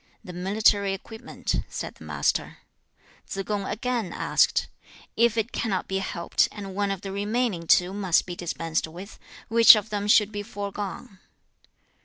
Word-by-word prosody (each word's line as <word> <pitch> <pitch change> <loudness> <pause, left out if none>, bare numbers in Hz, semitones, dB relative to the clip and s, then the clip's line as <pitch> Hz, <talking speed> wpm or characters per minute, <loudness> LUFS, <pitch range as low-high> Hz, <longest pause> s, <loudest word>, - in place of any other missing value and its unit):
'The 180 - -9
military 200 +2 +2
equipment,' 220 +3 -5
said - - -5
the - - -15
Master. - - -1 0.7
3. 195 - -4
Tsze - - -23
kung 205 -2 -2
again 235 -4 -2
asked, - - +2 0.5
'If 235 0 +3
it 225 +2 0
cannot 200 -5 -2
be 190 0 -1
helped, 170 -3 0
and 200 -2 -8
one 200 +1 -1
of 195 -2 -3
the 195 - -6
remaining 205 -3 -1
two 180 +3 +4
must 190 -4 +2
be 175 - -6
dispensed 165 -2 -2
with, 180 +6 -11 0.3
which 230 0 +9
of 215 0 -3
them 205 -1 -2
should 210 0 +5
be 205 -1 -4
foregone?' 200 -2 -6
200 Hz, 160 wpm, -25 LUFS, 190-215 Hz, 0.7 s, which